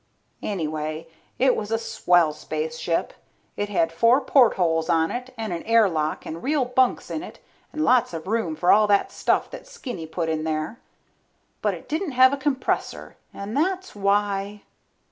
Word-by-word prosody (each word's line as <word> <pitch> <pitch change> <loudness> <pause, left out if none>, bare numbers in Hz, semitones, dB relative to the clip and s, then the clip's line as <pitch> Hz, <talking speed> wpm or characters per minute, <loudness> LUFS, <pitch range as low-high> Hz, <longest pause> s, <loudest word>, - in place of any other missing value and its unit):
Anyway, 155 -4 -3 0.3
it 260 -1 +3
made 210 0 -4
a 225 - +2
swell 175 -7 +2
spaceship. 160 +2 -3 0.4
It 205 0 -3
had 165 -5 +1
four 230 +10 +4
portholes 180 - +3
on 165 0 +2
it 250 +1 -5
and 220 -4 -3
an 170 - -4
air 230 -1 +4
lock 155 -3 -2
and 165 +1 -6
real 285 -1 +1
bunks 250 0 +1
in 310 - -3
it 360 - -10 0.3
and 310 - -2
lots 250 -1 +3
of 165 -2 -6
room 195 -6 -1
for 175 +3 +3
all 215 0 +5
that 200 -1 +2
stuff - - 0
that - - -10
Skinny 255 - -7
put 165 +1 -3
in 160 -1 -1
there. 155 +8 -3 0.8
But - - 0
it - - -13
didn't 315 -1 -2
have 260 +2 +6
a - - -1
compressor 275 -2 -2 0.2
and 200 +2 -7
that's 375 +5 -1
why 200 0 0
205 Hz, 170 wpm, -24 LUFS, 165-255 Hz, 0.8 s, have